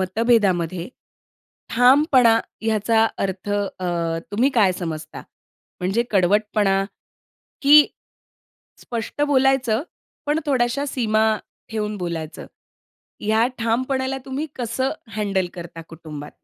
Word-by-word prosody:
मतभेदामध्ये 185 -4 +1 0.9
ठामपणा 250 -1 +5 0.3
याचा 220 +1 +2
अर्थ 195 +1 -3
अ, 200 -2 -2 0.5
तुम्ही 245 +7 +2
काय 205 -6 +4
समजता? 155 -2 -6 0.6
म्हणजे 195 +6 +1
कडवटपणा? 200 0 +2 0.8
की 295 +1 +8 0.9
स्पष्ट 235 +4 -4
बोलायचं 265 -4 +2 0.4
पण 300 +2 +1
थोड्याशा 265 0 +1
सीमा 220 -5 +1 0.5
ठेवून 210 -1 -3
बोलायचं. 170 -4 -5 0.7
या 220 +2 +2
ठामपणाला 260 +3 -1
तुम्ही 270 +4 -3
कसं 250 +2 -1 0.2
हँडल 200 -3 0
करता 170 -2 -8
कुटुंबात? 155 -3 -9
220 Hz, 90 wpm, -22 LUFS, 190-255 Hz, 0.9 s, की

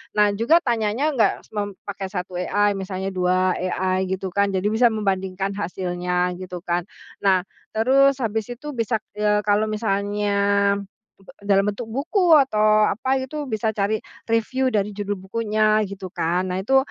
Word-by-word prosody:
Nah 210 -1 +4
juga 235 - +3
tanyanya 235 +4 0
nggak 225 -8 0
semem 205 -2 -3
pakai 195 -1 -5
1 180 -2 -5
AI, 205 +2 +1
misalnya 190 0 -4
2 185 0 +2
AI 185 +1 -1
gitu 190 0 -3
kan, 200 +1 +1
jadi 185 - -1
bisa 230 +3 +4
membandingkan 195 -3 -1
hasilnya, 180 -2 -2
gitu 180 -2 -7
kan. 175 +1 -1 0.3
Nah, 190 -2 +3 0.3
terus 270 +4 +4
habis 220 -1 -1
itu 255 +5 -7
bisa, 230 -3 -1 0.2
eee, 210 0 +2
kalau 210 +1 +2
misalnya 205 -1 -1 0.9
be 195 - -23 0.2
dalam 195 0 +4
bentuk 225 +2 -7
buku 330 - +3
atau 215 -6 +4
apa 260 +5 0
gitu, 275 +2 -5
bisa 220 -1 -1
cari 205 +1 0 0.3
reviu 255 +4 +1
dari 210 -3 -1
judul 205 0 -3
bukunya, 215 +2 +1
gitu 190 -2 -8
kan. 175 +3 0
Nah 185 - -1
itu, 265 +7 +3
205 Hz, 155 wpm, -22 LUFS, 190-225 Hz, 0.9 s, Nah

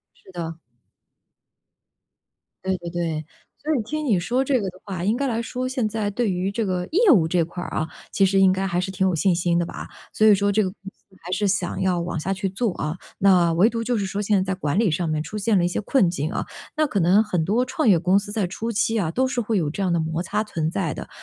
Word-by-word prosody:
是 190 - -18
的。 165 -2 -5 2.1
对 190 0 0
对 175 -1 -7
对。 165 -3 -3 0.4
所 310 +1 +1
以 245 - +1
听 305 +6 -3
你 215 -8 +3
说 245 +9 0
这 260 -4 +2
个 195 - -2
的 185 +1 -15
话， 185 -3 -4
应 215 +5 +1
该 280 - 0
来 230 -2 -1
说 255 +2 -3
现 255 -4 -1
在 215 -1 -2
对 210 0 0
于 185 +2 -1
这 225 +2 -1
个 180 -2 -1
业 400 +1 +5
务 175 - +5
这 170 0 +2
块 175 +2 -7
儿 - - -6
啊， 155 - -2 0.2
其 195 - +3
实 195 0 +2
应 190 -1 +6
该 190 +1 -1
还 175 -2 0
是 180 - -2
挺 190 0 0
有 185 - +2
信 180 +2 +2
心 170 0 +1
的 170 - 0
吧。 - - -7 0.3
所 215 - +3
以 215 - +8
说 200 +1 +2
这 210 +1 +2
个 190 - -1
公 185 - -13 0.2
司 190 -1 -26
还 180 - -8
是 200 +2 +1
想 185 -2 -1
要 185 -2 +1
往 170 -1 -3
下 190 +5 -2
去 195 0 -1
做 200 0 -1
啊。 155 +1 -3 0.2
那 180 -3 +4
唯 185 +7 +4
独 230 -1 -3
就 240 0 0
是 200 - -1
说 195 +2 -3
现 205 0 +2
在 190 0 0
在 - - -4
管 160 +2 0
理 225 - +3
上 165 +1 -1
面 155 -1 0
出 210 +7 -6
现 210 0 +2
了 175 - +3
一 - - +3
些 180 - -2
困 205 -4 +3
境 160 0 -2
啊， - - -2 0.3
那 310 -1 +3
可 200 -7 0
能 185 +5 +5
很 180 -7 -1
多 225 +8 +1
创 255 -3 +1
业 180 - +5
公 185 +3 +3
司 205 0 -8
在 210 -4 0
初 225 +6 -4
期 225 +1 +1
啊， 175 -7 0
都 260 +7 +1
是 250 -1 -1
会 220 0 0
有 160 -5 0
这 195 +6 -3
样 185 - +1
的 170 - +2
摩 160 +1 -2
擦 210 +5 -1
存 160 -6 -2
在 170 -6 -1
的。 - - -8
190 Hz, 295 characters per minute, -23 LUFS, 175-220 Hz, 2.1 s, 以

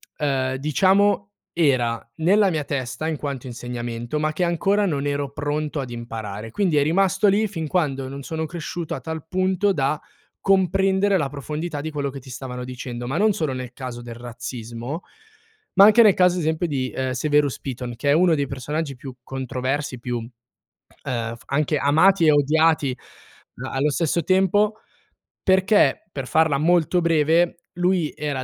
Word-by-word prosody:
ehm, 130 -3 0
diciamo 190 +8 +3 0.3
era 125 -8 +1
nella 200 +4 +4
mia 155 -4 -1
testa 140 +3 -3
in 155 - -2
quanto 140 -3 -5
insegnamento, 120 +2 -4
ma 155 0 0
che 175 +3 0
ancora 195 +5 +1
non 145 -6 -1
ero 145 -1 -2
pronto 145 +1 -2
ad 130 - -6
imparare. 115 -3 -6
Quindi 175 - +1
è 145 - +4
rimasto 195 +6 +2
lì 205 +3 +3
fin 165 -5 -4
quando 140 -6 0
non 140 +1 -7
sono 160 +2 -3
cresciuto 170 0 -5
a - - -7
tal 160 +2 -6
punto 185 +2 +1
da 140 -1 0 0.4
comprendere 195 +1 +2
la 150 -6 0
profondità 150 +2 -5
di 160 +1 -5
quello 140 -2 -2
che 135 - -8
ti 130 - -14
stavano 125 0 -6
dicendo, 125 -1 -6
ma 135 +6 -2
non 210 +2 +3
solo 155 -8 -1
nel 130 -1 -6
caso 125 -2 -7
del 120 -1 -8
razzismo, 120 +4 -6 0.7
ma 195 +1 +8
anche 215 +3 +7
nel 210 -4 +6
caso 180 -1 +3
ad 180 - -1
esempio 160 +2 0
di, 130 -4 -2
ehm, 130 -1 -1
Severus 145 0 +1
Piton, 125 -2 -5
che 140 +4 -1
è - - +5
uno 175 +1 +4
dei 140 -2 -1
personaggi 140 +2 -4
più 130 0 -9
controversi, 130 +1 -3
più, 120 0 -3 0.9
ehm, 115 -2 -3
f 115 - -18
anche 150 +2 0
amati 160 +6 +4
e 155 - +6
odiati 150 -1 +3 0.7
a - - -6
allo 140 +3 +1
stesso 165 +2 0
tempo. 195 +4 +2 0.7
Perché 190 +3 +3
per 135 -5 -5
farla 160 -1 +3
molto 175 +3 +2
breve, 165 +1 +2
lui 180 -2 +1
era 145 -3 -2
150 Hz, 170 wpm, -23 LUFS, 130-175 Hz, 0.9 s, ma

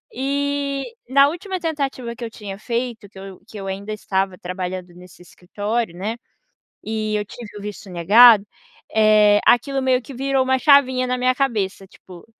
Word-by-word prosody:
E, 280 +1 -2 0.3
na 275 +1 +5
última 370 +5 -4
tentativa 275 -8 -3
que 240 - -9
eu 230 - -4
tinha 205 -3 -9
feito, 235 -1 -4
que 190 - -14
eu 195 -1 -10
que 215 - -11
eu 195 - -7
ainda 200 +2 -5
estava 190 -2 -2
trabalhando 180 0 -6
nesse 180 0 -16
escritório, 205 +3 -4
né, 210 +6 -4 0.7
e 215 -1 -3
eu 210 - -2
tive 210 0 -11
o 205 - -10
visto 205 -1 -8
negado. 205 +5 +6 0.5
Eh, 215 -1 +5
aquilo 270 +3 +3
meio 260 -1 +2
que 275 - -11
virou 270 +1 0
uma 260 0 +1
chavinha 260 -3 +4
na 250 0 -1
minha 255 0 +2
cabeça, 210 -8 -2
tipo, 180 -2 -15
225 Hz, 170 wpm, -21 LUFS, 195-260 Hz, 0.7 s, negado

